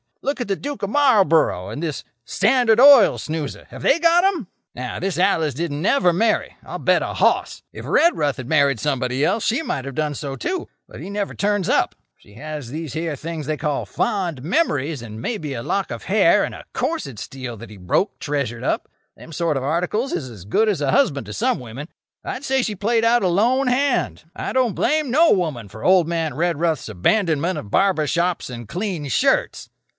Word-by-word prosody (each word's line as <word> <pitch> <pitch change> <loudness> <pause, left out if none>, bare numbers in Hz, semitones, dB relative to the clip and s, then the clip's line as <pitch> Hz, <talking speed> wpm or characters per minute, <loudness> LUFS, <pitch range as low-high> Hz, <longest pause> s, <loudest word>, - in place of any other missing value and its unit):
Look 280 0 -1
at 245 - -3
the 195 - 0
Duke 280 -2 -6
of 200 - -1
Marlborough 190 - +3
and 115 +8 -6
this 155 -5 -3 0.2
Standard 225 - +3
Oil 270 -5 +8
snoozer. 155 -2 -5
Have - - -10
they 320 - +4
got 340 +1 +4
'em? 365 - 0 0.3
"Now, 125 0 -5
this 190 -1 -2
Alice 160 -5 +2
didn't 150 -1 -3
never 190 -2 +3
marry, 220 +5 0
I'll - - -7
bet - - +3
a - - -4
hoss. - - +1
If - - -9
Redruth 150 - +2
had 130 -3 -7
married 140 -5 +3
somebody 130 +1 0
else 225 - 0
she 245 +7 +1
might 135 - -3
have 140 -2 -7
done 150 -1 -1
so, 140 -1 -5
too. 360 - -3 0.2
But - - -11
he - - -7
never 200 0 -3
turns 205 -2 0
up. - - +1 0.2
She 100 - -20
has 150 -1 -7
these 155 -1 -6
here 160 -1 -2
things 160 +1 -6
they 155 +1 -2
call 150 -2 -2
fond 175 -10 -2
memories, 155 - 0
and 110 -1 -8
maybe 155 - -3
a 115 -2 -5
lock 195 +8 -1
of - - -6
hair 200 -1 +4
and - - -3
a - - -11
corset 255 - -3
steel 125 +2 -7
that 110 0 -11
he 105 - -11
broke, 95 - 0
treasured 140 -6 -3
up. - - -1 0.3
Them 165 - -13
sort 165 -2 0
of 130 - -3
articles 180 - -1
is 130 -5 -3
as 100 -7 -12
good 215 - +2
as 190 -8 -1
a 140 -2 +1
husband 145 - +2
to 105 - -6
some 100 - 0
women. 125 +4 -8 0.4
I'd 255 - -5
say 265 -1 +1
she 215 -4 -2
played 225 +4 +1
out 235 -1 +3
a - - +3
lone 240 +9 +2
hand. 265 +1 0
I - - -4
don't 255 -5 +2
blame 305 -2 +1
no 320 +5 +5
woman 155 - 0
for 110 +3 -11
old 185 -3 +4
man 165 -4 -2
Redruth's 165 -4 0
abandonment 165 - +1
of 100 - -10
barber 190 -6 +2
shops 175 -1 0
and 120 -2 -8
clean 180 - -3
shirts." 130 - +1
165 Hz, 205 wpm, -21 LUFS, 140-220 Hz, 0.4 s, Oil